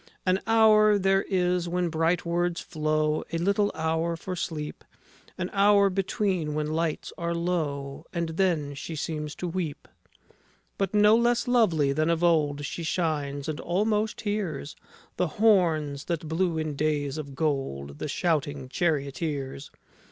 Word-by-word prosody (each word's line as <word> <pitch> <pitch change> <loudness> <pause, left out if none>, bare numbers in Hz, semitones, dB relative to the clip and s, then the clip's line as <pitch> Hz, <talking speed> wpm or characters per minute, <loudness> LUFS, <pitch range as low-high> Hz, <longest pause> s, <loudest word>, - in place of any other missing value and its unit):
An 185 0 +3
hour 215 -2 +6
there 195 0 +3
is 180 -2 +1
when 175 0 0
bright 165 +2 +1
words 175 +1 0
flow, 155 -1 0
A 165 - -1
little 200 +4 +1
hour 160 +1 0
for 185 +2 -5
sleep, 155 -3 -5 0.5
An 180 0 -3
hour 200 0 +5
between, 185 -5 -1
when 150 0 -1
lights 160 -1 -2
are 170 0 -1
low, 155 -4 -2
And 170 -1 -2
then 160 -4 0
she 140 +4 -6
seems 150 -1 -4
to 180 - -4
weep, 165 -4 -4 0.9
But 195 +1 -1
no 210 +1 +6
less 240 +2 +2
lovely 175 - +3
than 155 +3 +1
of 170 0 +1
old 150 -4 +2
She 155 - -5
shines, 150 -4 -1
and 155 -1 -3
almost 210 +4 0
hears 200 -10 -3 0.4
The 180 - +1
horns 165 -10 +3
that 165 -2 -3
blew 165 +1 0
in 155 -2 -2
days 145 -1 -1
of 140 -3 -7
gold, 130 - -2
The - - -3
shouting 145 -4 -1
charioteers. 140 -3 -2
165 Hz, 145 wpm, -27 LUFS, 150-185 Hz, 0.9 s, hour